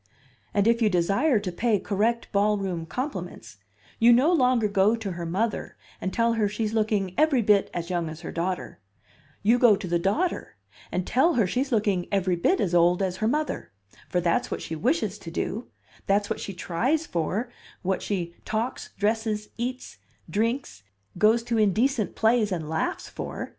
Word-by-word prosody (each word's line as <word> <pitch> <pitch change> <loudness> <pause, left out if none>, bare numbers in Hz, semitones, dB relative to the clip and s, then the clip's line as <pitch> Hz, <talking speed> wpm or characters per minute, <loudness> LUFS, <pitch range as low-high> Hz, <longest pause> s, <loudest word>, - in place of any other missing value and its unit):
And 200 +1 +2
if 235 +1 +3
you 220 - +4
desire 200 - +2
to 195 -3 -4
pay 220 +4 +1
correct 220 +5 -1
ballroom 200 -5 0
compliments, 180 - -5 0.4
you 235 +1 +7
no 265 +9 +5
longer 250 -7 +3
go 200 +2 +3
to 220 -4 -5
her 170 -1 -5
mother 205 +6 -2 0.2
and 190 - -2
tell 230 +1 +2
her 215 -3 +1
she's 215 +1 -2
looking 210 -4 0
every 295 -6 +4
bit 205 -1 +3
as 170 +1 -4
young 170 -2 -1
as 155 +1 -9
her 165 - -6
daughter; 170 -10 -3 0.6
you 230 +4 +4
go 235 -4 +6
to 190 - -6
the 170 0 +1
daughter 210 - -1 0.4
and 180 0 -1
tell 315 +8 +3
her 225 - +3
she's 260 +9 -1
looking 205 -6 +1
every 185 -3 +1
bit 360 - +2
as 180 -3 0
old 175 +2 +4
as 185 -1 -2
her 215 - 0
mother, 300 - -2 0.4
for 180 - +1
that's 170 -1 +1
what - - -4
she 160 - -5
wishes 215 - 0
to 165 - -8
do, 210 +7 -3 0.4
that's 205 +1 +1
what - - -2
she 195 - -6
tries 245 - 0
for, 205 - -2 0.3
what 190 0 0
she 175 -4 -3
talks, 225 +4 -3
dresses, 215 0 -1
eats, 250 +2 -5 0.3
drinks, 225 - -2 0.4
goes 220 +3 +4
to 230 -1 0
indecent 215 +3 +1
plays 220 -2 +2
and 165 -4 -3
laughs 160 +1 -2
for. - - -6
210 Hz, 180 wpm, -26 LUFS, 180-235 Hz, 0.6 s, you